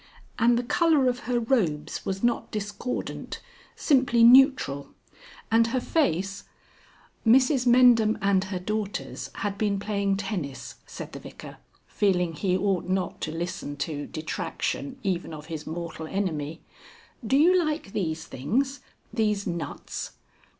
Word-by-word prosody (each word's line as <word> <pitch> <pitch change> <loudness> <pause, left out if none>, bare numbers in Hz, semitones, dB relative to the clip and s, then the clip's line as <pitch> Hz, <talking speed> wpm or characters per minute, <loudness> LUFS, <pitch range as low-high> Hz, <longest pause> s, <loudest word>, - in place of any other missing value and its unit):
And 235 +1 +4
the 245 - 0
colour 305 +1 +3
of 245 0 0
her 240 - +2
robes 175 - 0
was 195 +2 -3
not 240 0 +1
discordant 205 +3 -4 0.4
simply 255 -5 +3
neutral. 245 - +5 0.6
And 230 0 +5
her 255 +2 0
face 195 - 0 0.4
" - - -30
"Mrs 255 +2 +4
Mendham 240 -3 +6
and 195 -1 +2
her 190 -1 -4
daughters 210 +2 -4
had 200 0 -3
been 205 -2 +1
playing 200 -1 0
tennis," 190 -9 -5
said - - -8
the - - -6
Vicar, - - -11 0.3
feeling 180 -4 +1
he 185 +3 0
ought 190 -2 0
not 185 -1 -1
to 155 - -2
listen 165 -3 -4
to 145 -1 -3
detraction 205 - -4
even 180 -4 -2
of 150 -1 -10
his 155 -1 -6
mortal 160 -1 -5
enemy. 160 -5 -3 0.6
"Do 250 +4 +2
you 350 +4 +5
like 305 -10 -3
these 160 -4 -2
things 265 - -1 0.3
these 210 -3 0
nuts?" 170 -3 -5
200 Hz, 135 wpm, -26 LUFS, 175-245 Hz, 0.6 s, Mendham